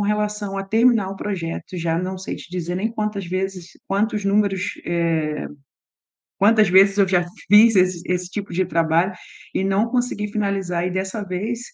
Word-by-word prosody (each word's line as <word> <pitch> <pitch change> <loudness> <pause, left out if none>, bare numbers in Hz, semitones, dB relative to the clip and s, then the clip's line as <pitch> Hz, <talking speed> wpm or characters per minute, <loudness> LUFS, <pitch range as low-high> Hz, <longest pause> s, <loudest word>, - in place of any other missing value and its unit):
relação 210 -1 -1
a 195 - -3
terminar 225 -1 +3
o 195 - -7
projeto 185 -3 -5
e - - -3
já 165 -1 0
não 185 +1 -3
sei 190 - -5
te - - -12
dizer 175 -1 -3
nem 215 +5 -1
quantas 210 -3 -3
vezes 185 -1 -4 0.2
quantos 210 +1 0
números 200 -1 +2 0.2
eh, 165 -3 -1 0.9
quantas 215 0 +5
vezes 195 +2 +5
eu 195 - +4
já 180 -1 +2 0.3
fiz 215 +1 +7
esse 185 -2 +2
esse 180 0 -1
tipo 200 -2 -5
de 185 +2 +1
trabalho 165 +2 +1 0.4
e 190 - 0
não 195 +4 +1
consegui 245 -4 -1
finalizar. 195 -4 -1
E 185 - -2
dessa 190 +3 -3
vez 205 +6 -3
195 Hz, 175 wpm, -21 LUFS, 180-210 Hz, 0.9 s, fiz